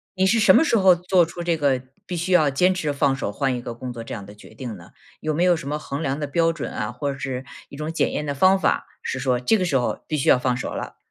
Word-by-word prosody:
你 190 Hz, 0 st, +2 dB
是 225 Hz, +4 st, +3 dB
什 200 Hz, -3 st, +7 dB
么 -, -, +6 dB
时 235 Hz, -, +3 dB
候， 190 Hz, -3 st, +6 dB
做 180 Hz, 0 st, +3 dB
出 170 Hz, +1 st, -8 dB
这 170 Hz, -1 st, +1 dB
个 140 Hz, -4 st, +1 dB, 0.2 s
必 180 Hz, -, -4 dB
须 180 Hz, +3 st, -1 dB
要 155 Hz, -5 st, +5 dB
坚 180 Hz, +7 st, +3 dB
持 160 Hz, -5 st, -2 dB
放 140 Hz, -1 st, +1 dB
手 115 Hz, -6 st, -3 dB
换 135 Hz, +2 st, -1 dB
一 120 Hz, -, -5 dB
个 120 Hz, -1 st, -6 dB
工 125 Hz, +1 st, -7 dB
作 115 Hz, -, -7 dB
这 -, -, -7 dB
样 100 Hz, -3 st, -6 dB
的 105 Hz, +1 st, -13 dB
决 105 Hz, -, -15 dB
定 115 Hz, -1 st, -6 dB
呢？ 85 Hz, -3 st, -14 dB, 0.3 s
有 155 Hz, -, -1 dB
没 160 Hz, -, -1 dB
有 180 Hz, -1 st, +5 dB
什 140 Hz, -3 st, -6 dB
么 150 Hz, +1 st, -2 dB
衡 140 Hz, 0 st, -5 dB
量 135 Hz, 0 st, -1 dB
的 145 Hz, -, -2 dB
标 165 Hz, +3 st, +2 dB
准 165 Hz, -, -5 dB
啊， -, -, -3 dB
或 145 Hz, -2 st, -3 dB
者 135 Hz, -, -10 dB
是 130 Hz, -1 st, -4 dB, 0.2 s
一 140 Hz, -, -11 dB
种 155 Hz, +1 st, -3 dB
检 -, -, +1 dB
验 150 Hz, -, -3 dB
的 145 Hz, -1 st, -3 dB
方 190 Hz, +6 st, +4 dB
法， 175 Hz, -, +1 dB, 0.2 s
是 135 Hz, -, -3 dB
说 125 Hz, -2 st, +1 dB
这 130 Hz, -, +2 dB
个 190 Hz, -, -1 dB
时 150 Hz, -6 st, +2 dB
候 125 Hz, -, -2 dB
必 155 Hz, -, -1 dB
须 135 Hz, -, -2 dB
要 -, -, +7 dB
放 125 Hz, -1 st, 0 dB
手 -, -, -4 dB
了？ -, -, -6 dB
145 Hz, 330 characters per minute, -23 LUFS, 130-175 Hz, 0.3 s, 什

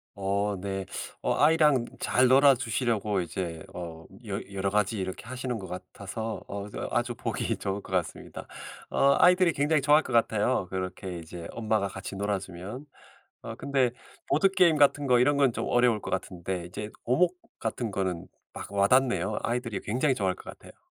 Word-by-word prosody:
어 100 Hz, +1 st, -1 dB
네. 95 Hz, -1 st, -3 dB, 0.4 s
어 -, -, +2 dB
아이랑 150 Hz, -5 st, +4 dB
잘 130 Hz, 0 st, +3 dB
놀아주시려고 120 Hz, -6 st, +3 dB
이제 85 Hz, 0 st, -4 dB
어 80 Hz, -2 st, -7 dB, 0.2 s
여 100 Hz, -, -2 dB
여러 100 Hz, 0 st, 0 dB
가지 105 Hz, +1 st, +1 dB
이렇게 95 Hz, +3 st, -5 dB
하시는 125 Hz, -1 st, -4 dB
것 95 Hz, -, -7 dB
같아서 100 Hz, +4 st, -6 dB
어 100 Hz, 0 st, -5 dB
그래서 -, -, -5 dB
아주 120 Hz, 0 st, 0 dB
보기 -, -, -2 dB
좋을 100 Hz, +1 st, -3 dB
것 95 Hz, -, -13 dB
같습니다. 90 Hz, -3 st, -3 dB, 0.4 s
어 140 Hz, 0 st, +4 dB
아이들이 180 Hz, -1 st, +5 dB
굉장히 145 Hz, +1 st, +2 dB
좋아할 150 Hz, +3 st, +5 dB
것 130 Hz, -, -6 dB
같아요, 115 Hz, -2 st, +2 dB
그렇게 95 Hz, -1 st, -4 dB
이제 85 Hz, +1 st, -8 dB
엄마가 110 Hz, -3 st, 0 dB
같이 95 Hz, +1 st, -7 dB
놀아주면. 100 Hz, +5 st, -4 dB, 0.6 s
어 -, -, -6 dB
근데 135 Hz, -3 st, +1 dB, 0.4 s
보드게임 180 Hz, 0 st, +4 dB
같은 145 Hz, 0 st, +4 dB
거 125 Hz, -1 st, +5 dB
이런 140 Hz, +3 st, +3 dB
건 135 Hz, -4 st, +4 dB
좀 -, -, -3 dB
어려울 120 Hz, -3 st, +3 dB
것 -, -, -6 dB
같은데 90 Hz, -1 st, -3 dB
이제 105 Hz, +4 st, -6 dB, 0.2 s
오목 175 Hz, +8 st, +3 dB, 0.2 s
같은 115 Hz, 0 st, -2 dB
거는 95 Hz, -3 st, -2 dB, 0.3 s
막 -, -, -7 dB
와 100 Hz, 0 st, +3 dB
닿네요. 110 Hz, -7 st, +2 dB
아이들이 115 Hz, -3 st, -2 dB
굉장히 130 Hz, +6 st, +1 dB
좋아할 95 Hz, -6 st, 0 dB
것 -, -, -13 dB
같아요. -, -, -16 dB
110 Hz, 355 characters per minute, -28 LUFS, 95-130 Hz, 0.6 s, 아이들이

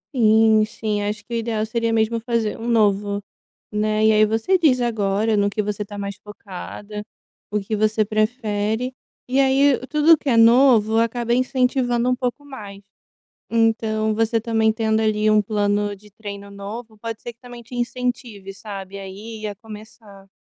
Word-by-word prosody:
Sim, 220 Hz, -2 st, +5 dB
sim. 215 Hz, -1 st, -3 dB
Acho 210 Hz, +1 st, -4 dB
que 235 Hz, -, -9 dB
o -, -, 0 dB
ideal 225 Hz, -2 st, -1 dB
seria 230 Hz, +1 st, -1 dB
mesmo 225 Hz, +1 st, +1 dB
fazer 230 Hz, -2 st, -2 dB
um 230 Hz, -, -5 dB
novo, 205 Hz, -3 st, +2 dB, 0.5 s
né. 215 Hz, +1 st, +1 dB
E -, -, +6 dB
aí, 215 Hz, 0 st, +5 dB
você 225 Hz, -, +1 dB
visa 255 Hz, -8 st, +3 dB
agora 210 Hz, 0 st, 0 dB
no 205 Hz, 0 st, +2 dB
que 210 Hz, +1 st, -1 dB
você 210 Hz, 0 st, -3 dB
tá 205 Hz, 0 st, -9 dB
mais 200 Hz, 0 st, -5 dB
focada, 210 Hz, +1 st, -9 dB, 0.5 s
o 210 Hz, 0 st, 0 dB
que 215 Hz, +2 st, -3 dB
você 215 Hz, 0 st, +1 dB
prefere. 215 Hz, +2 st, -1 dB, 0.3 s
E 260 Hz, +2 st, +1 dB
aí, 270 Hz, 0 st, +4 dB
tudo 300 Hz, +3 st, +5 dB
que 280 Hz, -, -3 dB
é 235 Hz, -, +3 dB
novo 230 Hz, -2 st, +5 dB
acaba 235 Hz, +1 st, +1 dB
incentivando 250 Hz, -1 st, +1 dB
um 250 Hz, -, +2 dB
pouco 250 Hz, +2 st, -3 dB
mais. 210 Hz, -9 st, -10 dB, 0.7 s
Então, 220 Hz, -1 st, +1 dB
você 225 Hz, +1 st, +1 dB
também, 220 Hz, -1 st, +2 dB
tendo 220 Hz, -1 st, +1 dB
ali 215 Hz, -1 st, +2 dB
um 215 Hz, -, +5 dB
plano 205 Hz, -1 st, 0 dB
de 210 Hz, +1 st, -19 dB
treino 200 Hz, -1 st, -9 dB
novo, 215 Hz, +3 st, -8 dB
pode 225 Hz, 0 st, -6 dB
ser 240 Hz, -, -6 dB
que 230 Hz, -, -32 dB
também 245 Hz, -1 st, -11 dB
te 245 Hz, -, -11 dB
incentive, 240 Hz, -5 st, -3 dB
sabe, 195 Hz, -1 st, -8 dB
a 195 Hz, -, -7 dB
ir 215 Hz, +3 st, -9 dB
e 215 Hz, -, -2 dB
a 205 Hz, -, -6 dB
começar. 210 Hz, -2 st, -13 dB
220 Hz, 175 wpm, -22 LUFS, 210-235 Hz, 0.7 s, E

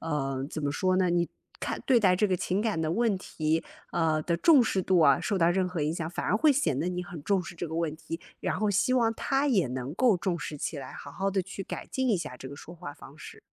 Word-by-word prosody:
呃， 135 Hz, -4 st, -2 dB
怎 155 Hz, -, -5 dB
么 145 Hz, -, 0 dB
说 185 Hz, +5 st, +1 dB
呢， 185 Hz, -1 st, +3 dB
你 175 Hz, 0 st, +1 dB, 0.3 s
看 -, -, -3 dB
对 255 Hz, -3 st, +5 dB
待 190 Hz, -4 st, +5 dB
这 210 Hz, -, +3 dB
个 185 Hz, -, +2 dB
情 185 Hz, +3 st, -1 dB
感 210 Hz, -6 st, 0 dB
的 160 Hz, 0 st, 0 dB
问 225 Hz, -1 st, +1 dB
题， 160 Hz, -3 st, -1 dB, 0.3 s
啊， 160 Hz, -2 st, +1 dB
的 170 Hz, +2 st, 0 dB
重 290 Hz, -, +6 dB
视 200 Hz, -4 st, 0 dB
度 185 Hz, -1 st, +3 dB
啊， 140 Hz, -4 st, +6 dB
受 210 Hz, -4 st, -1 dB
到 170 Hz, -1 st, +4 dB
任 185 Hz, +1 st, +1 dB
何 180 Hz, -3 st, -3 dB
影 150 Hz, +1 st, 0 dB
响， 165 Hz, -2 st, -3 dB
反 -, -, -4 dB
而 -, -, +2 dB
会 295 Hz, +6 st, +5 dB
显 265 Hz, -, +1 dB
得 175 Hz, -, 0 dB
你 180 Hz, 0 st, -2 dB
很 175 Hz, -3 st, -8 dB
重 195 Hz, -2 st, +2 dB
视 175 Hz, -, -9 dB
这 175 Hz, -, -3 dB
个 160 Hz, -, -6 dB
问 165 Hz, -2 st, -1 dB
题， 165 Hz, +1 st, -6 dB, 0.2 s
然 -, -, -1 dB
后 215 Hz, -1 st, +1 dB
希 205 Hz, +6 st, +2 dB
望 235 Hz, -3 st, +3 dB
他 270 Hz, +4 st, 0 dB
也 200 Hz, -, +3 dB
能 130 Hz, +2 st, -4 dB
够 235 Hz, -1 st, +4 dB
重 175 Hz, -1 st, -1 dB
视 150 Hz, -, -5 dB
起 150 Hz, +1 st, -4 dB
来， 135 Hz, -, -8 dB
好 145 Hz, -, -9 dB
好 195 Hz, +7 st, -2 dB
地 195 Hz, -1 st, 0 dB
去 190 Hz, +2 st, -7 dB
改 -, -, -6 dB
进 260 Hz, -1 st, -1 dB
一 220 Hz, -, +3 dB
下 150 Hz, -7 st, -5 dB
这 130 Hz, -, -8 dB
个 140 Hz, -, -8 dB
说 160 Hz, -, -11 dB
话 175 Hz, -2 st, -8 dB
方 140 Hz, +1 st, -14 dB
式。 -, -, -10 dB
175 Hz, 295 characters per minute, -28 LUFS, 155-200 Hz, 0.3 s, 重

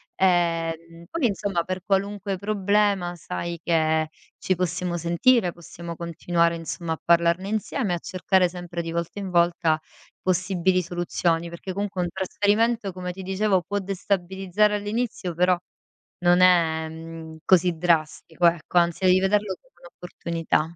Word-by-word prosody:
Ehm, 165 Hz, -2 st, 0 dB
poi 330 Hz, -6 st, -1 dB
insomma 195 Hz, -5 st, 0 dB
per 185 Hz, +1 st, -4 dB
qualunque 200 Hz, 0 st, -1 dB
problema 200 Hz, -2 st, +1 dB
sai 170 Hz, 0 st, -5 dB
che 160 Hz, -2 st, +2 dB, 0.3 s
ci 185 Hz, -, 0 dB
possiamo 180 Hz, 0 st, -2 dB
sentire, 175 Hz, +5 st, +3 dB
possiamo 170 Hz, 0 st, -9 dB
continuare 170 Hz, 0 st, 0 dB
insomma 165 Hz, 0 st, -4 dB
a -, -, -8 dB
parlarne 170 Hz, +3 st, +3 dB
insieme 215 Hz, 0 st, -1 dB
e -, -, +2 dB
a -, -, -4 dB
cercare 185 Hz, 0 st, +1 dB
sempre 175 Hz, -1 st, -6 dB
di 165 Hz, -, -5 dB
volta 170 Hz, +4 st, -3 dB
in 190 Hz, -2 st, -5 dB
volta 170 Hz, -2 st, +3 dB, 0.4 s
possibili 185 Hz, 0 st, +1 dB
soluzioni, 170 Hz, -1 st, -1 dB
perché 175 Hz, +2 st, -7 dB
comunque 200 Hz, -2 st, -2 dB
un 175 Hz, -, -2 dB
trasferimento, 205 Hz, +3 st, 0 dB
come 180 Hz, -1 st, -5 dB
ti 190 Hz, +2 st, -9 dB
dicevo, 190 Hz, -1 st, +1 dB
può 205 Hz, +4 st, -2 dB
destabilizzare 195 Hz, +1 st, 0 dB
all'inizio, 205 Hz, -3 st, -2 dB
però 180 Hz, +1 st, +3 dB, 0.7 s
non 175 Hz, +1 st, +5 dB
è, 160 Hz, -3 st, +4 dB
mhmm, 160 Hz, 0 st, -9 dB
così 180 Hz, -2 st, +4 dB
drastico, 165 Hz, 0 st, 0 dB
ecco, 170 Hz, +1 st, 0 dB
anzi 170 Hz, +2 st, 0 dB
devi 185 Hz, 0 st, +6 dB
vederlo 195 Hz, 0 st, +1 dB
come 260 Hz, -, -30 dB
un'opportunità. 170 Hz, -2 st, -2 dB
180 Hz, 140 wpm, -24 LUFS, 170-195 Hz, 0.7 s, devi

